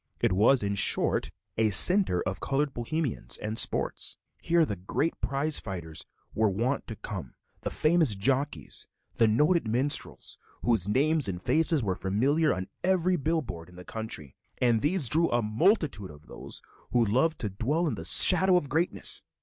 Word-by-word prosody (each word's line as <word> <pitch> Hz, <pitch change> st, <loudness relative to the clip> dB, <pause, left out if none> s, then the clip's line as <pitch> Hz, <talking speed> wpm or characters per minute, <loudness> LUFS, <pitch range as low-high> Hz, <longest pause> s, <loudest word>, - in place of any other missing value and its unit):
It -, -, +1 dB
was, 110 Hz, +6 st, +3 dB
in 100 Hz, 0 st, -1 dB
short, 100 Hz, -, +2 dB, 0.3 s
a 110 Hz, -1 st, +3 dB
center 180 Hz, -, +2 dB
of 90 Hz, +1 st, -4 dB
colored 140 Hz, 0 st, -2 dB
Bohemians 135 Hz, +3 st, -3 dB
and 105 Hz, +1 st, -5 dB
sports. -, -, +1 dB, 0.2 s
Here 170 Hz, -1 st, +2 dB
the 105 Hz, -, -4 dB
great 100 Hz, -, -2 dB
prize 140 Hz, +3 st, 0 dB
fighters 85 Hz, -6 st, -6 dB, 0.3 s
were 110 Hz, -1 st, +1 dB
wont 115 Hz, +8 st, -2 dB
to 115 Hz, -, -7 dB
come, 95 Hz, -, -8 dB, 0.3 s
the -, -, -3 dB
famous 155 Hz, -7 st, +3 dB
jockeys, 135 Hz, +8 st, -2 dB, 0.3 s
the 115 Hz, -, +2 dB
noted 150 Hz, +7 st, +2 dB
minstrels, 130 Hz, +6 st, -1 dB, 0.2 s
whose 110 Hz, -5 st, +3 dB
names 145 Hz, +4 st, +2 dB
and 90 Hz, -2 st, -4 dB
faces 160 Hz, -, +2 dB
were 95 Hz, -3 st, -1 dB
familiar 130 Hz, -, 0 dB
on 95 Hz, 0 st, -4 dB, 0.2 s
every 185 Hz, -1 st, +1 dB
bill 160 Hz, +1 st, -1 dB
board 85 Hz, -7 st, -9 dB
in 90 Hz, -, -17 dB
the 90 Hz, 0 st, -12 dB
country; 110 Hz, -, -5 dB, 0.2 s
and 120 Hz, -3 st, +1 dB
these 155 Hz, -2 st, +2 dB
drew 165 Hz, +6 st, +2 dB
a 120 Hz, -1 st, 0 dB
multitude 130 Hz, -, 0 dB
of 75 Hz, 0 st, -15 dB
those -, -, -8 dB, 0.3 s
who 120 Hz, -2 st, +2 dB
love 135 Hz, +10 st, +1 dB
to 105 Hz, -4 st, -5 dB
dwell 140 Hz, -, -1 dB
in 155 Hz, -, -1 dB
the -, -, -7 dB
shadow 185 Hz, 0 st, +6 dB
of 145 Hz, -6 st, -3 dB
greatness. 160 Hz, +6 st, 0 dB
125 Hz, 170 wpm, -27 LUFS, 100-155 Hz, 0.3 s, shadow